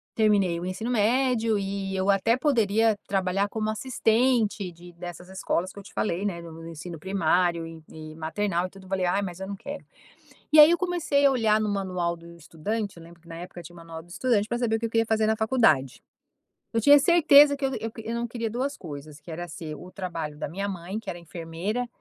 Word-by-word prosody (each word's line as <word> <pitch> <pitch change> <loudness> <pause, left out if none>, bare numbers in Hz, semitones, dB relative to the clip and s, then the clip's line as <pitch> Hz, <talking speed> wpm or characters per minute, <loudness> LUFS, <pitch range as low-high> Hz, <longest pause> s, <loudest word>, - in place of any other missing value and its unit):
terminei 200 -6 +3
o 175 - -5
ensino 195 +6 -3
médio 230 -1 +2
e 195 0 -3
eu 190 +1 0
até 215 +5 +3
poderia 225 -6 +2
trabalhar 195 +1 +1
como 215 0 -2
assistente 220 -3 +1
de 175 +1 -14
dessas 175 +1 -9
escolas 185 -1 -2
que - - -10
eu - - -11
te - - -14
falei, 185 -2 -1
né, 175 -4 -2
no 165 -1 -10
no 165 0 -10
ensino 165 +1 -8
primário 175 -1 +1
e 165 -1 -11
e 155 0 -10
maternal 175 +3 -1
e - - -16
tudo, 195 0 -15
falei: 190 -1 0
"Ai, 180 +3 +1
mas 185 -2 -6
eu 190 - -4
não 200 - -5
quero". 280 +7 -8 0.7
E 310 - +6
aí 300 +1 +11
eu 345 - +2
comecei 345 -6 +1
a 280 - +7
olhar 220 -4 +2
no 215 - 0
manual 185 -4 -1
do 170 0 -13
estudante, 195 +6 -4
eu 170 - -12
lembro 170 0 -16
que 170 - -19
na 165 - -8
época 175 +1 -8
tinha 170 +1 -12
o - - -15
manual 165 -1 -9
do 170 - -21
estudante 215 +2 0
pra 240 - -1
saber 225 -2 +1
o - - -3
que 230 - -1
eu - - -6
queria 225 0 +2
fazer 220 -1 +2
na 220 - +2
faculdade. 215 - +2 0.7
Eu 225 - +1
tinha 285 +5 +8
certeza 295 -3 +6
que 280 - -8
eu 270 - 0
eu 225 - -4
que 225 - -9
eu 230 - -3
não 235 0 -2
queria 230 -1 -3
2 260 +6 -2
coisas, 150 - -9
que 165 - -10
era 175 +2 -5
ser 155 0 -7
o 180 +5 -11
trabalho 165 -6 -5
da - - -4
minha 200 +5 -3
mãe 190 +2 -5
que 220 -3 -8
era 175 - -4
enfermeira, 170 +8 -4
195 Hz, 235 wpm, -26 LUFS, 170-225 Hz, 0.7 s, aí